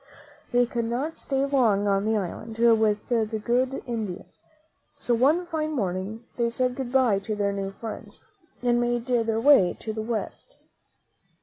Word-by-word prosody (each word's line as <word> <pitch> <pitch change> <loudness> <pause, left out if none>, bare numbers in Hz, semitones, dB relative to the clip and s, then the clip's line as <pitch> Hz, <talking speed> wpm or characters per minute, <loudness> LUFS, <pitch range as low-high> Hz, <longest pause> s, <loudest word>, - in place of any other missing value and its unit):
They 245 0 +4
could 235 -1 -2
not 260 +8 -2
stay 270 0 -1
long 230 -8 +2
on 195 0 +1
the 220 0 +2
island 210 +4 -5
with 220 -3 +3
the 225 -2 0
good 255 +2 0
Indians, 220 -7 -5 0.6
so 245 - -1
one 290 +10 +3
fine 310 -2 -2
morning 200 -1 -3
they 235 -1 +1
said 250 +1 0
good 260 -2 -4
by 250 -7 +3
to 210 +2 -4
their 200 -1 0
new 195 -1 -3
friends, 220 +1 -8 0.4
and 240 -1 +3
made 240 -1 0
their 230 -3 +1
way 230 -8 +5
to 220 - -5
the 220 - -3
West. 230 - -5
235 Hz, 165 wpm, -26 LUFS, 215-255 Hz, 0.6 s, way